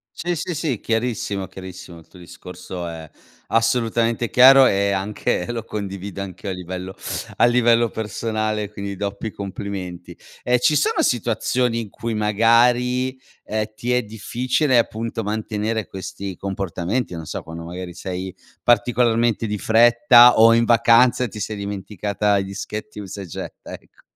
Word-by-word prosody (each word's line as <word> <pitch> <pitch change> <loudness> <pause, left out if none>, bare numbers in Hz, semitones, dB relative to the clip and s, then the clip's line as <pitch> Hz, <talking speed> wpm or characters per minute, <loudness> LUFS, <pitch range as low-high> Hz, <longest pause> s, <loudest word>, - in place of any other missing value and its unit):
Sì, 175 +1 -2
sì, 170 +2 -3
sì, 140 -7 -2
chiarissimo, 110 -4 -2
chiarissimo, 95 -2 -10
il 80 - -19
tuo 90 - -17
discorso 90 0 -9
è 80 -2 -9 0.4
assolutamente 115 0 +1
chiaro 135 +2 +8
e 100 -1 +1
anche 95 -1 -2
lo 115 -2 -3
condivido 100 -2 -6
anch'io 95 0 -7
a - - -1
livello 90 +1 -6 0.4
a - - +5
livello 120 -1 +3
personale, 110 0 -3
quindi 100 -1 -6
doppi 100 +2 -4
complimenti. 95 -2 -7 0.3
E 125 0 +2
ci 150 +5 +3
sono 150 - +2
situazioni 120 0 0
in 110 -3 -6
cui 115 +2 -4
magari, 120 +4 +2 0.3
ehm, 110 0 -1
ti 120 +3 -2
è 125 - +2
difficile 125 +5 0
appunto 115 0 -1
mantenere 110 0 -2
questi 95 0 -7
comportamenti, 95 +3 -3
non 80 -2 -6
so - - -5
quando 80 0 -9
magari 90 +1 -7
sei 95 +1 -6 0.3
particolarmente 115 -1 +2
di 105 0 -2
fretta 120 +3 +6
o 115 +1 +7
in 115 0 +3
vacanza 120 +1 +4
ti 105 - -9
sei 105 +1 -3
dimenticata 100 +1 -2
i 95 - -2
dischetti 105 +2 -7
usa 100 0 -7
e - - -7
getta 85 - -8
ecco. - - -14
110 Hz, 145 wpm, -21 LUFS, 95-120 Hz, 0.4 s, chiaro